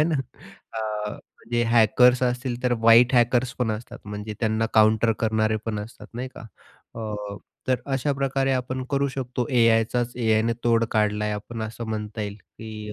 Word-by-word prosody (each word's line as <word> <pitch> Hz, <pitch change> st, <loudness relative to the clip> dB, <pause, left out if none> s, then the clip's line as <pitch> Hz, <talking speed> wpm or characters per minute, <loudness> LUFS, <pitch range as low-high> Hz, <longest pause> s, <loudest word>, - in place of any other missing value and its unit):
है -, -, +5 dB
ना. 140 Hz, -, +1 dB, 0.5 s
अ, 105 Hz, -1 st, -3 dB, 0.3 s
जे 120 Hz, 0 st, +2 dB
हॅकर्स 120 Hz, +2 st, +4 dB
असतील 125 Hz, 0 st, -1 dB
तर 125 Hz, -, +3 dB
व्हाइट 115 Hz, +3 st, +6 dB
हॅकर्स 120 Hz, +1 st, +3 dB
पण 125 Hz, -3 st, +1 dB
असतात, 120 Hz, +2 st, -7 dB
म्हणजे 105 Hz, +1 st, -6 dB
त्यांना 110 Hz, -1 st, +1 dB
काउंटर 110 Hz, +1 st, +5 dB
करणारे 110 Hz, -1 st, +1 dB
पण 110 Hz, -2 st, -2 dB
असतात 105 Hz, +3 st, -10 dB
नाही 125 Hz, +2 st, -4 dB
का. -, -, -9 dB, 0.5 s
अ, 110 Hz, -1 st, -4 dB, 0.5 s
तर 130 Hz, -1 st, +2 dB
अशाप्रकारे 135 Hz, 0 st, 0 dB
आपण 130 Hz, 0 st, -2 dB
करू 140 Hz, 0 st, +1 dB
शकतो 125 Hz, -2 st, -3 dB
AIचाच, 115 Hz, 0 st, +3 dB
AIनं 115 Hz, -1 st, +2 dB
तोड 115 Hz, -1 st, +3 dB
काढला 105 Hz, -1 st, +1 dB
आहे 105 Hz, 0 st, -1 dB
आपण 110 Hz, +2 st, -6 dB
असं 115 Hz, +2 st, -5 dB
म्हणता 110 Hz, 0 st, -4 dB
येईल, 100 Hz, 0 st, -5 dB
की 105 Hz, 0 st, -9 dB
115 Hz, 165 wpm, -24 LUFS, 110-125 Hz, 0.5 s, व्हाइट